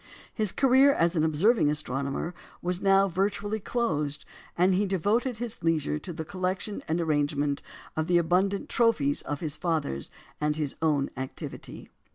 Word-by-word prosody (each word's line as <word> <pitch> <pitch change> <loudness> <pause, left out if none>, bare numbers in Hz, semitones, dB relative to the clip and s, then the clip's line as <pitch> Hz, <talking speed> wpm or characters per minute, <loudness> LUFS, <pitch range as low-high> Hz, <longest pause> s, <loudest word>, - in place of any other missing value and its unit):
His 215 -3 0
career 270 +1 +5
as 170 -3 +1
an 155 - +2
observing 160 +4 +3
astronomer 140 +2 -2 0.3
was 180 +1 -2
now 195 0 +5
virtually 205 +3 -1
closed, 150 - -2 0.3
and 180 +2 +4
he 200 +2 +2
devoted 215 +7 0
his 235 -1 -4
leisure 155 -2 +1
to 175 - -7
the 160 -1 -5
collection 185 +3 -2
and 160 +2 0
arrangement 145 -3 0 0.3
of 160 0 -1
the 175 -1 +4
abundant 185 +4 +1
trophies 190 -13 +2
of 145 -1 -4
his 155 -3 -2
father's 155 - -2 0.3
and 150 0 +1
his 150 -3 -2
own 150 -4 +1
activity. 130 0 -7
170 Hz, 155 wpm, -28 LUFS, 150-200 Hz, 0.3 s, career